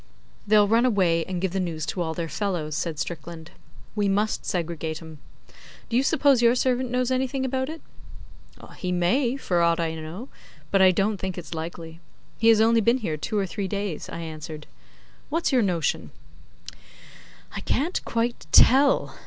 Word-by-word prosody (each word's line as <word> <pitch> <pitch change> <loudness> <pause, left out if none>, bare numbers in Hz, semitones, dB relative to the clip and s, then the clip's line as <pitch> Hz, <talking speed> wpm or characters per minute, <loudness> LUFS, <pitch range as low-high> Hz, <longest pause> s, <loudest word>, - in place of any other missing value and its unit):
'They'll 210 0 +5
run 225 +3 +3
away 185 -9 +2
and 185 -2 -4
give 190 -2 0
the 190 - -2
news 165 -4 -3
to 180 - -3
all 160 -1 -2
their 170 -1 -3
fellows,' 160 -3 -3
said 165 -1 -3
Strickland. 165 +1 -6 0.4
'We 205 -2 +1
must 210 +2 0
segregate 160 -3 -3
'em. 160 -2 -12 0.7
Do 230 - -2
you 250 - +5
suppose 275 -2 +3
your 235 +1 +5
servant 255 0 0
knows 250 +1 0
anything 260 +1 0
about 260 +1 -1
it?' 320 +1 -8 0.9
'He 180 - -3
may, 235 +9 +1
for 175 -10 0
aught 170 0 +3
I 165 -1 -1
know; 160 - -7 0.4
but 195 - +4
I 190 - +8
don't 195 +3 +1
think 190 -1 -5
it's 170 -2 -7
likely. 165 0 -7 0.4
He 225 - +2
has 225 -1 +6
only 230 +1 +4
been 235 +4 +3
here 205 -11 -3
two 210 +8 -3
or 200 - +1
three 190 +2 -4
days,' 200 -4 -4
I 170 - -6
answered. 155 -1 -7 0.6
'What's 330 +2 0
your 255 -2 +4
notion?' 175 -6 -1 1.5
'I - - -3
can't 325 +7 -1
quite 235 +1 -2
tell. 275 +3 +5
195 Hz, 175 wpm, -25 LUFS, 165-240 Hz, 1.5 s, I